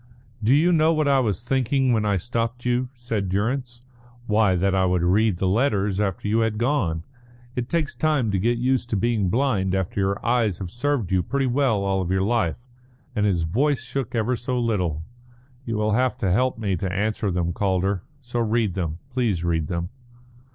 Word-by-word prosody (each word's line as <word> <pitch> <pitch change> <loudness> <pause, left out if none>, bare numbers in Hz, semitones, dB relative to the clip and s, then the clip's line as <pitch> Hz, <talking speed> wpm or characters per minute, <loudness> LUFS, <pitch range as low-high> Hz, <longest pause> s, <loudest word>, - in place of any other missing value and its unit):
"Do 120 +6 +4
you 165 +5 +4
know 160 -1 +4
what 155 -2 +1
I 140 -1 +4
was 110 -4 0
thinking 130 +1 +1
when 110 -2 +1
I 100 -2 +2
stopped 120 +4 -3
you?" 125 +1 0
said 115 -6 -3
Durrance. 120 +5 -2 0.4
"Why, 105 -4 +3
that 95 +2 +1
I 95 -1 +2
would 90 -1 +1
read 100 +2 +3
the 95 - 0
letters 100 -2 +1
after 105 -1 -1
you 110 +2 +2
had 110 -1 0
gone. 110 - 0 0.5
It 125 0 -3
takes 165 -4 -1
time 150 -8 +1
to 95 - 0
get 120 +5 +1
used 125 0 0
to - - 0
being 110 -3 +1
blind 100 -6 +1
after 95 +1 -2
your 100 +1 -1
eyes 115 -6 +2
have 95 -3 -6
served 120 -5 -1
you 95 -1 +3
pretty 140 +8 -1
well 125 -5 +1
all 95 -2 0
your 95 0 +2
life." 105 -6 +1 0.6
And 105 -1 +2
his 90 -4 +1
voice 130 - +1
shook 130 -1 -4
ever 115 +2 +1
so 125 +1 -2
little. 90 -10 -1 0.6
"You 115 -2 -2
will 105 0 +1
have 125 +3 +1
to 95 -4 0
help 125 +7 +1
me 100 -4 -1
to 95 +2 -3
answer 105 +2 -1
them, 85 -1 -1
Calder. 95 0 0 0.2
So 120 -2 -4
read 115 -3 +1
them. 85 -4 -3
Please 115 -9 0
read 80 -3 0
them." 85 +1 -3
110 Hz, 195 wpm, -24 LUFS, 95-125 Hz, 0.6 s, Do